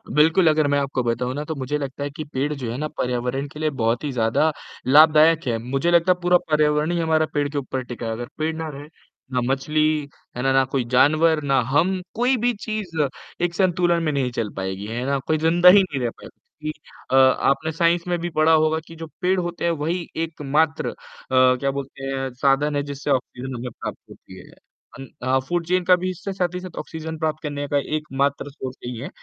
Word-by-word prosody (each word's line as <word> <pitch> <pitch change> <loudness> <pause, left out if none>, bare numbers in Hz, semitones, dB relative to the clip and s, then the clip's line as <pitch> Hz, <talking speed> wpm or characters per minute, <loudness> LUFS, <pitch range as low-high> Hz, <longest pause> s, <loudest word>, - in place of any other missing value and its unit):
बिल्कुल, 160 +4 +5
अगर 155 -1 +3
मैं 145 0 +2
आपको 135 -2 -1
बताऊँ 120 +2 -1
ना, 150 - -3
तो 160 - -4
मुझे 140 +1 -2
लगता 140 -1 -5
है 145 - -2
कि 145 +2 -7
पेड़ 145 +1 -2
जो 125 -5 -4
है 120 - -4
ना, 155 +2 -2
पर्यावरण 125 -1 -2
के 150 - -11
लिए 155 0 +1
बहुत 120 -2 -1
ही 145 - -2
ज़्यादा 120 +6 +2 0.4
लाभदायक 155 +3 +6
है। 115 -2 +1
मुझे 135 +8 -1
लगता 170 +1 +4
है, 180 - +1
पूरा 180 0 +5
पर्यावरण 150 +1 +2
ही 175 - 0
हमारा 160 -1 +2
पेड़ 145 -1 +1
के 145 - -5
ऊपर 130 -1 -3
टिका 120 -1 -7
है, 115 - -2
अगर 120 +2 -5
पेड़ 160 +1 -1
ना 160 0 -4
रहें, 145 0 -9 0.5
ना 125 - +1
मछली, 150 +2 +1 0.3
है - - -2
ना? 135 - +2
ना 135 - +5
कोई 135 -2 +1
जानवर, 155 +5 +4
ना 135 -1 +2
हम, 180 +6 +2
कोई 250 +3 +2
भी 245 +1 +1
चीज़ 215 -7 -4 0.5
एक 175 -1 0
संतुलन 175 -2 +2
में 155 - +1
नहीं 135 -3 -1
चल 115 -3 -2
पाएगी। 95 +1 -4
है 120 +3 -3
ना? 140 +1 +1
कोई 155 - +2
ज़िंदा 170 +3 +5
ही 195 +2 +7
नहीं 145 -7 -4
रह 120 - 0
पाएगा, - - -13 0.3
क्योंकि 155 0 -5 0.3
अ, - - +3
आपने 135 +3 +3
साइंस 170 +2 +1
में 175 0 0
भी 175 +1 -3
पढ़ा 155 +1 +5
होगा 155 0 +3
कि 165 - -11
जो 165 0 -8
पेड़ 185 +1 +2
होते 175 -1 -4
हैं, 170 - +3
वही 165 +3 -2 0.2
एकमात्र 155 0 0
अ, - - -8 0.4
क्या 130 +1 +4
बोलते 135 0 -7
हैं? 135 -1 -2
साधन 140 +3 +1
है, 145 - 0
जिससे 140 0 -4
ऑक्सीजन 130 0 -2
हमें 125 +1 -5
प्राप्त - - -7
होती - - -13
है। - - -14 0.5
अन 135 - -9
अ, - - -3
हाँ, 130 +1 +3
फ़ूड 175 +1 -1
चेन 180 +2 +1
का 180 +1 +6
भी 180 +1 -3
इससे 195 +2 -6
साथ 180 -2 -1
ही - - -2
साथ 180 -2 -10
ऑक्सीजन 160 0 -6
प्राप्त 155 -1 -1
करने 145 -1 -3
का 145 - +1 0.2
एकमात्र 140 -1 -1
सोर्स 130 -2 -7
यही 120 -1 -5
हैं, 130 - -6
150 Hz, 230 wpm, -22 LUFS, 135-165 Hz, 0.5 s, ही